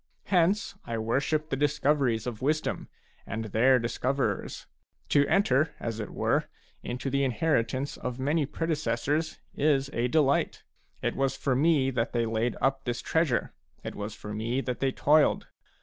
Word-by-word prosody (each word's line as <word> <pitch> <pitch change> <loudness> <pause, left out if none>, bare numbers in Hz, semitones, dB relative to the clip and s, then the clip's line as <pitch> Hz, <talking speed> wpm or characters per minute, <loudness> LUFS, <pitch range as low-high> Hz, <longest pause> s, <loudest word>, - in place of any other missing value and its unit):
Hence 190 +3 +2
I 115 - -4
worship 140 +7 0
the - - +2
discoveries 140 -4 +1
of 120 -4 -5
wisdom 155 +3 -1 0.4
and 115 0 -3
their 120 +5 +4
dis 115 -1 -3
coverers; 135 +1 -1 0.4
to 145 0 +4
enter, 155 -6 +2
as 115 -1 -4
it 110 - -4
were, - - 0 0.4
into 125 +2 -4
the 140 +1 +2
inheritance 130 0 0
of 125 -1 -4
many 145 +2 +1
predecessors 155 0 -1 0.2
is 140 -2 +1
a 120 +1 +1
delight. 140 0 +1 0.4
It - - 0
was 135 0 0
for 135 -4 0
me 140 -2 +3
that 130 - -1
they 120 -1 +1
laid 115 +2 -1
up 135 0 +1
this 120 -1 -2
treasure; 160 -7 +1 0.3
it - - -5
was 105 +1 -5
for 105 - -7
me 115 +4 -1
that 125 -2 -3
they 135 -1 +1
toiled. 150 +3 +3
135 Hz, 160 wpm, -28 LUFS, 120-150 Hz, 0.4 s, their